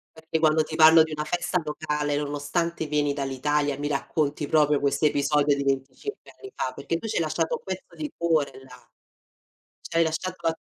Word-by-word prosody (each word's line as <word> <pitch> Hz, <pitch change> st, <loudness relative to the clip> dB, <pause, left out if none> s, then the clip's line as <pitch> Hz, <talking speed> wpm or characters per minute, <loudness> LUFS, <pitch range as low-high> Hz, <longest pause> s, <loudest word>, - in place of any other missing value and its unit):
Perché, 160 Hz, 0 st, -3 dB
quando 155 Hz, 0 st, +4 dB
ti 155 Hz, -, -7 dB
parlo 160 Hz, 0 st, +8 dB
di 160 Hz, -, -6 dB
una 150 Hz, 0 st, -3 dB
festa 175 Hz, +2 st, -1 dB
locale, 150 Hz, -1 st, -2 dB
nonostante 150 Hz, +3 st, -2 dB
vieni 145 Hz, -1 st, +1 dB
dall'Italia, 140 Hz, +1 st, -1 dB
mi 145 Hz, +1 st, -3 dB
racconti 145 Hz, +1 st, -1 dB
proprio 150 Hz, -2 st, +3 dB
quest'episodio 145 Hz, 0 st, +2 dB
di 140 Hz, -, -2 dB
25 135 Hz, -, -3 dB
anni 395 Hz, -, -11 dB
fa, 130 Hz, -, -2 dB
perché 165 Hz, -, -3 dB
tu 225 Hz, -, -6 dB
ci -, -, -3 dB
hai -, -, +2 dB
lasciato 160 Hz, +1 st, 0 dB
un -, -, -22 dB
pezzo 190 Hz, -1 st, -7 dB
di 300 Hz, -2 st, -5 dB
cuore 160 Hz, -4 st, +1 dB
là. 125 Hz, -1 st, -16 dB, 1.0 s
Ci 165 Hz, -, -3 dB
hai 165 Hz, -, +6 dB
lasciato 165 Hz, +2 st, -3 dB
la 165 Hz, -, +1 dB
150 Hz, 185 wpm, -25 LUFS, 145-165 Hz, 1.0 s, parlo